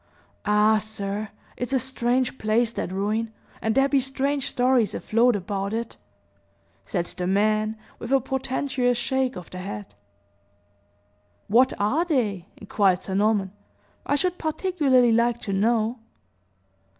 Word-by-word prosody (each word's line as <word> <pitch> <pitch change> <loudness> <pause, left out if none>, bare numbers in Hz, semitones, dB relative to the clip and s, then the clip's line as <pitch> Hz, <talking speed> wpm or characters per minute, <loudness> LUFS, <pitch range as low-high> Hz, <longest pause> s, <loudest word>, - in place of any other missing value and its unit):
Ah, 210 +1 +4
sir, 210 0 -4 0.3
it's 250 +2 -4
a - - +4
strange 255 0 -1
place, 225 +2 +1
that 185 - -4
ruin, 215 +4 -1 0.3
and 220 0 0
there 270 0 +4
be 280 -1 +3
strange 270 +1 -1
stories 250 -3 +2
afloat 235 +2 +2
about 200 +1 -3
it," 230 +1 -3 0.9
said 175 -3 -2
the 180 +1 -4
man, 215 +3 +1 0.2
with 235 - -6
a 270 - +5
portentious 260 -1 -1
shake 265 +1 0
of 180 - -9
the 185 - -7
head. 105 - -7 1.5
"What 240 +5 +4
are 255 +12 +2
they?" 210 - -1
inquired 195 -3 +1
Sir 190 - -5
Norman. 200 -1 +1 0.5
"I 285 - 0
should 360 +4 -1
particularly 300 -7 +2
like 235 +1 +2
to 200 - -3
know." 225 +3 +1
230 Hz, 135 wpm, -25 LUFS, 205-260 Hz, 1.5 s, a